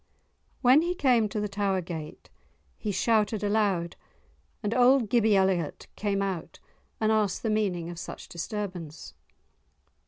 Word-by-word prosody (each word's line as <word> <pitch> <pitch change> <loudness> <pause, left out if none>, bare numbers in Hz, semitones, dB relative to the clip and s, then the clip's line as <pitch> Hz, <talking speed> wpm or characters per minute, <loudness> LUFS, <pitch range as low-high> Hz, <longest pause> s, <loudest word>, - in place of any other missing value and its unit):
When 255 +5 +7
he 350 +2 -1
came 245 -8 +3
to 210 - -3
the 210 - -1
tower 195 -1 0
gate 165 -4 -8 0.4
he 210 - -3
shouted 215 0 +1
aloud, 205 -5 +1 0.7
and 210 +1 0
old 250 -2 +4
Gibby 220 -3 +4
Elliot 190 -4 +1
came 200 -1 -1
out 180 -4 -4 0.4
and 220 0 +2
asked 210 -4 +1
the 225 - 0
meaning 190 -6 0
of 170 -1 -7
such - - -8
disturbance. 175 -3 -6
205 Hz, 135 wpm, -27 LUFS, 180-220 Hz, 0.7 s, When